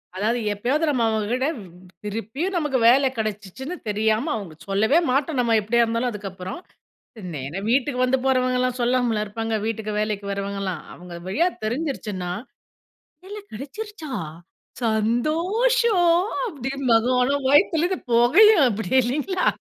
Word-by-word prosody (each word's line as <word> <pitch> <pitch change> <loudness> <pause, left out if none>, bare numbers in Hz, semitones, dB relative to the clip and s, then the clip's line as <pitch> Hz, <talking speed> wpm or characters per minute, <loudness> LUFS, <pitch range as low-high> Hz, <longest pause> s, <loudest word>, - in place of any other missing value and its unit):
அதாவது 220 +5 0
எப்பயாவது 265 +10 0
நம்ம 250 -5 +1
அவங்க 215 -1 -1
கிட்ட 260 +2 0 0.6
திருப்பியும் 225 - -3
நமக்கு 295 -5 0
வேல 270 +3 +6
கெடச்சுச்சுன்னு 215 - -4
தெரியாம 220 +7 +1
அவங்க 195 -7 -6
சொல்லவே 215 +9 +3
மாட்டோம் 275 +1 0
நம்ம 230 -2 +2
எப்படியா 235 +3 +2
இருந்தாலும் 230 +2 -1
அதுக்கப்புறம். 195 - -7 0.8
நேரா 140 +7 -5
வீட்டுக்கு 255 0 +1
வந்து 260 +1 +2
போறவங்கலாம் 255 -1 +1
சொல்லாமலா 240 -3 +1
இருப்பாங்க. 225 +2 -3
வீட்டுக்கு 220 -1 -3
வேலைக்கு 210 -1 -2
வரவங்கலா. 195 -1 -3 0.2
அவங்க 175 0 -11
வழியா 335 - +2 0.2
தெரிஞ்சுருச்சுனா, 215 - -3 0.9
வேலை 415 +2 -8
கெடச்சிருச்சா 315 - -7 0.7
சந்தோஷம் 345 - +2 0.2
அப்படின்பாங்க. 265 - 0
ஆனா, 270 +3 +2
வயித்திலிருந்து 340 +4 +3
பொகையும் 320 - +6
அப்படியே 225 +3 0
இல்லைங்களா? 300 +10 -1
245 Hz, 115 wpm, -23 LUFS, 215-295 Hz, 0.9 s, வேல